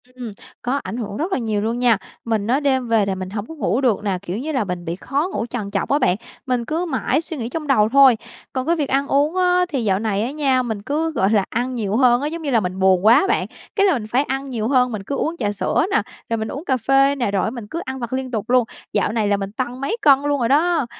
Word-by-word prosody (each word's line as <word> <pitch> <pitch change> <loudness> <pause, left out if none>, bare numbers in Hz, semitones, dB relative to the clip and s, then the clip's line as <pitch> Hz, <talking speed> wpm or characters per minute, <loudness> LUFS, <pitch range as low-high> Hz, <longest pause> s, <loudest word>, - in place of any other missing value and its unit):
Ừm, 245 -4 -6 0.3
có 255 +2 -1
ảnh 230 - -5
hưởng 210 -3 -5
rất 350 +5 -2
là - - +1
nhiều 215 -4 -1
luôn 230 +3 -1
nha. 240 -4 +4 0.3
Mình 220 -2 -1
á, 260 +4 +2
đêm 265 -4 +1
về 225 -3 +3
là 195 - -1
mình 185 0 -5
hổng 205 0 -4
có 320 - -9
ngủ 265 - 0
được 230 -5 +1
nè, 195 -3 0
kiểu 195 0 -4
như 295 +6 -3
là, 260 -6 0
mình 180 -3 -5
bị 165 - -3
khó 275 - -1
ngủ - - -1
trằn 225 -4 -5
trọc 200 - -1
á 285 +2 +3
bạn, 245 -8 +3 0.3
mình 250 -3 -1
cứ 325 +5 -1
mãi 300 0 0
suy 325 -1 -7
nghĩ 235 -1 -4
trong 305 +1 -5
đầu 215 -6 +4
thôi. 265 -2 +6 0.4
Còn 260 -1 -2
cái 340 - +3
việc 295 -4 -2
ăn 275 +1 +1
uống 290 +5 +2
á 360 0 +3
thì 270 -7 -2
dạo 195 -2 +1
này 210 -2 -1
á 250 - -2
nha, 275 -4 +1
mình 220 -4 -4
cứ, 315 +7 -1
gọi 195 -9 +1
là, 205 -3 +3
ăn 250 +2 -2
nhiều 215 -2 -1
hơn 250 -1 +4
á. 290 - -1
Giống 330 +2 -5
như 290 - -3
là, 235 - +4
mình 185 -1 -4
buồn 190 0 +3
quá 240 +10 +6
bạn, - - +1 0.3
cái 400 -1 +4
là 380 - +4
mình 225 -5 -3
phải 250 +6 +2
ăn 270 0 -4
nhiều 225 -3 -2
hơn, 250 -2 +3
mình 210 -3 -4
cứ 280 - -3
uống 335 +4 -2
trà 205 - -1
sữa 205 - 0
nè, - - +3 0.3
rồi 230 - 0
mình 220 0 -3
uống 285 +6 -6
cà 260 -5 +1
phê 270 +4 +3
nè, 240 -7 -1
rồi 195 -2 +1
á - - 0
mình 230 -4 -8
cứ 335 - -4
ăn 265 0 -5
vặt 235 0 -5
liên 260 - 0
liên 260 -1 -8
tục 220 0 -3
luôn, 250 -1 +5 0.3
dạo 205 0 +1
này 220 -2 0
là 205 0 +2
mình 195 0 -5
tăng 250 +3 -4
mấy 445 +12 -1
cân 275 -3 +6
luôn 290 0 0
rồi 235 -1 0
đó. 320 0 +3
250 Hz, 295 wpm, -21 LUFS, 215-280 Hz, 0.4 s, thôi